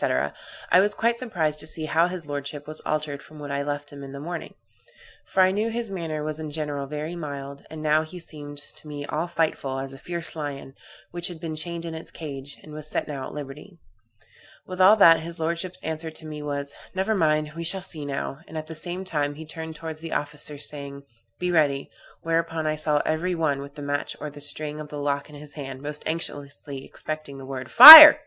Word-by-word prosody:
I -, -, +7 dB
was 205 Hz, +2 st, +2 dB
quite 235 Hz, +1 st, +1 dB
surprised 160 Hz, -11 st, -1 dB
to 155 Hz, -, -2 dB
see 155 Hz, 0 st, -3 dB
how 160 Hz, +3 st, +2 dB
his 180 Hz, -3 st, -6 dB
lordship 145 Hz, 0 st, -5 dB
was 155 Hz, 0 st, -7 dB
altered 150 Hz, -2 st, -2 dB
from 155 Hz, -, -15 dB
what 145 Hz, -1 st, -7 dB
I 140 Hz, 0 st, -1 dB
left 145 Hz, 0 st, -4 dB
him 140 Hz, -1 st, -10 dB
in 135 Hz, 0 st, -9 dB
the 140 Hz, -, -7 dB
morning; 170 Hz, +4 st, -6 dB, 0.7 s
for 190 Hz, -, +3 dB
I 185 Hz, -, +4 dB
knew 210 Hz, +4 st, -1 dB
his 230 Hz, -2 st, -4 dB
manner 160 Hz, -5 st, -4 dB
was 155 Hz, 0 st, -4 dB
in 155 Hz, -1 st, -5 dB
general 145 Hz, -2 st, -4 dB
very 150 Hz, +4 st, -5 dB
mild, 140 Hz, -3 st, -7 dB
and 155 Hz, 0 st, -8 dB
now 155 Hz, 0 st, +3 dB
he 160 Hz, +3 st, -9 dB
seemed 145 Hz, -3 st, -8 dB
to 145 Hz, +1 st, -8 dB
me 145 Hz, -1 st, -6 dB
all 155 Hz, +4 st, -3 dB
fightful, 160 Hz, -5 st, -1 dB
as 135 Hz, 0 st, -6 dB
a 135 Hz, -, -12 dB
fierce 170 Hz, +2 st, -4 dB
lion, 145 Hz, -3 st, -6 dB, 0.4 s
which 175 Hz, 0 st, -2 dB
had 175 Hz, -3 st, -8 dB
been 160 Hz, -1 st, -5 dB
chained 170 Hz, +2 st, -4 dB
in 165 Hz, -, -5 dB
its 160 Hz, 0 st, -8 dB
cage, 140 Hz, -3 st, -8 dB
and 155 Hz, -, -12 dB
was 155 Hz, 0 st, -8 dB
set -, -, -3 dB
at 135 Hz, -3 st, -5 dB
liberty. 150 Hz, +6 st, -9 dB, 0.9 s
With 185 Hz, 0 st, -4 dB
all 195 Hz, +3 st, +8 dB
that, 165 Hz, -6 st, +7 dB
his 170 Hz, +1 st, -6 dB
lordship's 170 Hz, +3 st, -3 dB
answer 160 Hz, +1 st, -4 dB
to 160 Hz, 0 st, -9 dB
me 150 Hz, -1 st, -7 dB
was, 140 Hz, -1 st, -4 dB, 0.2 s
'Never 190 Hz, +4 st, 0 dB
mind, 155 Hz, -5 st, +1 dB
we 170 Hz, -, -5 dB
shall 190 Hz, +4 st, +1 dB
see 165 Hz, -5 st, -6 dB
now;' 140 Hz, 0 st, -4 dB
and 160 Hz, -, -8 dB
at 155 Hz, -, -5 dB
the 160 Hz, -, -9 dB
same 175 Hz, +4 st, -4 dB
time 145 Hz, -4 st, -2 dB
he 160 Hz, +2 st, -9 dB
turned 160 Hz, 0 st, -7 dB
towards 160 Hz, 0 st, -7 dB
the 165 Hz, 0 st, -6 dB
officers, 150 Hz, 0 st, -3 dB
saying, 140 Hz, -1 st, -8 dB, 0.3 s
'Be 180 Hz, 0 st, -2 dB
ready,' 145 Hz, -5 st, +1 dB, 0.3 s
whereupon 165 Hz, -1 st, -1 dB
I 155 Hz, 0 st, 0 dB
saw 150 Hz, -1 st, 0 dB
every 175 Hz, +3 st, -1 dB
one 155 Hz, -4 st, 0 dB
with 140 Hz, +1 st, -11 dB
the 145 Hz, -, -8 dB
match 145 Hz, 0 st, -3 dB
or 150 Hz, -, -6 dB
the 145 Hz, 0 st, -11 dB
string 150 Hz, +1 st, -1 dB
of 150 Hz, -, -7 dB
the 150 Hz, -, -7 dB
lock 145 Hz, 0 st, -2 dB
in 150 Hz, -, -13 dB
his 145 Hz, 0 st, -9 dB
hand, 135 Hz, -2 st, -8 dB
most 150 Hz, +1 st, -5 dB
anxiously 145 Hz, -3 st, -5 dB
expecting 155 Hz, -1 st, -6 dB
the 135 Hz, -, -9 dB
word 130 Hz, -1 st, -6 dB
'Fire'! 300 Hz, +4 st, +15 dB
155 Hz, 220 wpm, -24 LUFS, 145-165 Hz, 0.9 s, Fire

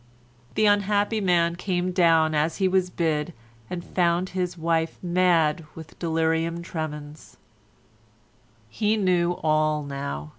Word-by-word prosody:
The 215 Hz, -, +3 dB
unhappy 205 Hz, +1 st, +2 dB
man 170 Hz, -3 st, +2 dB
came 180 Hz, 0 st, -2 dB
down 165 Hz, -3 st, +3 dB
as 155 Hz, +2 st, 0 dB
he 190 Hz, -, +2 dB
was 185 Hz, -1 st, +1 dB
bid 165 Hz, -1 st, -1 dB, 0.4 s
and 175 Hz, -1 st, -5 dB
found 175 Hz, 0 st, 0 dB
his 180 Hz, -1 st, -3 dB
wife 165 Hz, 0 st, -1 dB
mad 170 Hz, -3 st, +2 dB
with 160 Hz, -1 st, -12 dB
delirium 165 Hz, 0 st, 0 dB
tremens. 150 Hz, -3 st, -7 dB, 1.3 s
He 210 Hz, -, 0 dB
knew 180 Hz, -3 st, +2 dB
all 155 Hz, -1 st, +1 dB
now. 140 Hz, -, -5 dB
170 Hz, 120 wpm, -25 LUFS, 160-185 Hz, 1.3 s, The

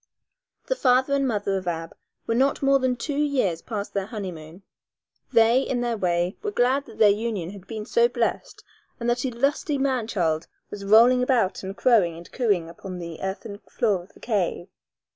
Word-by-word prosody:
The -, -, -1 dB
father 260 Hz, -, +3 dB
and 275 Hz, -1 st, +2 dB
mother 205 Hz, -4 st, -1 dB
of 185 Hz, -1 st, -6 dB
Ab 165 Hz, -1 st, -4 dB, 0.3 s
were 230 Hz, -, 0 dB
not 270 Hz, +4 st, +1 dB
more 275 Hz, 0 st, +4 dB
than 260 Hz, -1 st, +1 dB
two 280 Hz, +4 st, -3 dB
years 260 Hz, -, +1 dB
past 210 Hz, -3 st, -5 dB
their 195 Hz, -1 st, -2 dB
honeymoon. 180 Hz, -5 st, -7 dB, 0.7 s
They, 230 Hz, +3 st, +5 dB
in 255 Hz, -2 st, -2 dB
their 240 Hz, -1 st, -1 dB
way, 175 Hz, -2 st, 0 dB
were 420 Hz, -, -2 dB
glad 270 Hz, -5 st, +1 dB
that 225 Hz, -, -13 dB
their 215 Hz, -, +6 dB
union 205 Hz, -5 st, -2 dB
had 200 Hz, -1 st, -12 dB
been 215 Hz, -2 st, -6 dB
so 470 Hz, -, +3 dB
blest -, -, -2 dB, 0.4 s
and 235 Hz, -, -3 dB
that 245 Hz, +2 st, -1 dB
a -, -, 0 dB
lusty 280 Hz, +4 st, 0 dB
man 260 Hz, -4 st, 0 dB
child 165 Hz, -7 st, -1 dB, 0.2 s
was 205 Hz, -1 st, -7 dB
rolling 230 Hz, +5 st, +6 dB
about 250 Hz, -7 st, +1 dB
and 190 Hz, +1 st, -7 dB
crowing 200 Hz, -10 st, +3 dB
and 170 Hz, -, -12 dB
cooing 205 Hz, -10 st, 0 dB
upon 180 Hz, +2 st, -8 dB
the 170 Hz, -2 st, -7 dB
earthen 200 Hz, +2 st, -5 dB
floor 205 Hz, -6 st, 0 dB
of 180 Hz, -, -18 dB
the -, -, -18 dB
cave. 190 Hz, -5 st, -2 dB
220 Hz, 190 wpm, -24 LUFS, 190-255 Hz, 0.7 s, their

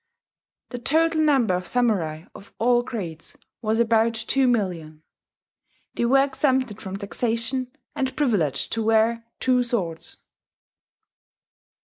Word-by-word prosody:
The 245 Hz, -, -6 dB
total 320 Hz, +5 st, +2 dB
number 270 Hz, -10 st, +3 dB
of 180 Hz, 0 st, -2 dB
samurai 190 Hz, -11 st, 0 dB
of 200 Hz, -, -14 dB
all 240 Hz, +1 st, +3 dB
grades 180 Hz, -10 st, -7 dB, 0.2 s
was 220 Hz, 0 st, 0 dB
about 230 Hz, 0 st, +3 dB
2,000,000. 210 Hz, -, 0 dB, 0.9 s
They 235 Hz, -, -1 dB
were 270 Hz, +3 st, +5 dB
exempted 260 Hz, -5 st, 0 dB
from 190 Hz, -1 st, -5 dB
taxation, 230 Hz, +4 st, -2 dB, 0.2 s
and 265 Hz, -1 st, -2 dB
privileged 195 Hz, -, 0 dB
to 225 Hz, -, -1 dB
wear 225 Hz, +1 st, +2 dB
two 255 Hz, -1 st, +2 dB
swords. 195 Hz, -10 st, -2 dB
230 Hz, 110 wpm, -24 LUFS, 200-255 Hz, 0.9 s, were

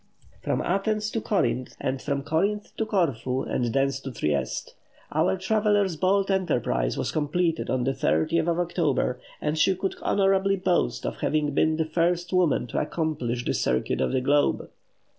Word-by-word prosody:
From -, -, -1 dB
Athens 215 Hz, +3 st, 0 dB
to 225 Hz, -, -2 dB
Corinth, 130 Hz, -, -1 dB
and 130 Hz, 0 st, -2 dB
from 140 Hz, -1 st, -2 dB
Corinth 200 Hz, +8 st, -1 dB
to 220 Hz, -, -1 dB
Corfu, 135 Hz, -, 0 dB
and 120 Hz, -, -1 dB
thence 135 Hz, +3 st, 0 dB
to 135 Hz, -1 st, -7 dB
Trieste. 75 Hz, -, -2 dB, 0.4 s
Our -, -, +2 dB
traveller's 205 Hz, -1 st, +1 dB
bold 195 Hz, +4 st, +2 dB
enterprise 120 Hz, -, 0 dB
was -, -, -1 dB
completed 165 Hz, +2 st, 0 dB
on 130 Hz, -1 st, 0 dB
the 135 Hz, -, +1 dB
30th 145 Hz, -, +1 dB
of 170 Hz, -1 st, +1 dB
October, 155 Hz, -7 st, 0 dB, 0.2 s
and 155 Hz, +1 st, -1 dB
she 190 Hz, +4 st, +4 dB
could 190 Hz, +1 st, -2 dB
honourably 195 Hz, 0 st, +2 dB
boast 185 Hz, -2 st, 0 dB
of -, -, -3 dB
having 150 Hz, -1 st, 0 dB
been 155 Hz, +2 st, +2 dB
the 160 Hz, -, +1 dB
first 175 Hz, +2 st, 0 dB
woman 180 Hz, -9 st, +2 dB
to 120 Hz, -, -2 dB
accomplish 125 Hz, -7 st, -2 dB
the -, -, 0 dB
circuit 65 Hz, -, 0 dB
of -, -, +1 dB
the 130 Hz, -1 st, +1 dB
globe. 145 Hz, +2 st, +1 dB
160 Hz, 165 wpm, -26 LUFS, 135-190 Hz, 0.4 s, she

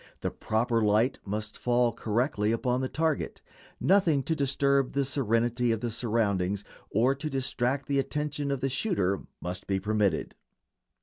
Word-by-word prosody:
The -, -, -1 dB
proper 115 Hz, +1 st, 0 dB
light 110 Hz, +4 st, +2 dB
must 105 Hz, +1 st, -3 dB
fall 120 Hz, -1 st, +2 dB
correctly 110 Hz, -1 st, 0 dB
upon 125 Hz, +2 st, 0 dB
the 130 Hz, -, -2 dB
target; 160 Hz, -1 st, -1 dB, 0.4 s
nothing 170 Hz, -8 st, +3 dB
to 160 Hz, -, 0 dB
disturb 140 Hz, -1 st, +1 dB
the 140 Hz, 0 st, +1 dB
serenity 120 Hz, -2 st, +1 dB
of 115 Hz, -1 st, -1 dB
the 120 Hz, -1 st, -2 dB
surroundings 100 Hz, -4 st, 0 dB, 0.3 s
or 120 Hz, +6 st, +3 dB
to 155 Hz, +3 st, -4 dB
distract 135 Hz, 0 st, 0 dB
the 140 Hz, -1 st, +1 dB
attention 145 Hz, +1 st, -2 dB
of 140 Hz, -2 st, -1 dB
the 135 Hz, -, +1 dB
shooter 125 Hz, -, 0 dB, 0.2 s
must 90 Hz, +1 st, -5 dB
be 95 Hz, -1 st, +1 dB
permitted. 100 Hz, -4 st, 0 dB
125 Hz, 150 wpm, -28 LUFS, 110-140 Hz, 0.4 s, nothing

